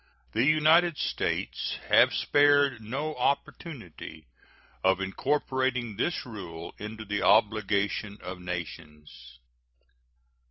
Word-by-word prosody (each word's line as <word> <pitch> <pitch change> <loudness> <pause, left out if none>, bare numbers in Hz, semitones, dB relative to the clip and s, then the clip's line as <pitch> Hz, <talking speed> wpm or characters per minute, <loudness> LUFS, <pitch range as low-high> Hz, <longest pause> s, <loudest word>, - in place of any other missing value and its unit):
The 115 - +1
United 155 +3 +4
States - - -2
have - - +6
spared 145 -4 +3
no 140 +8 -3
opportunity 135 - -4 0.6
of 95 0 +3
incorporating 125 +3 -1
this 160 - -1
rule 95 -9 -8
into 110 +1 -7
the 105 0 -2
obligation 105 -1 +2
of 90 0 -7
nations. 75 -7 -8
110 Hz, 90 wpm, -28 LUFS, 95-140 Hz, 0.6 s, have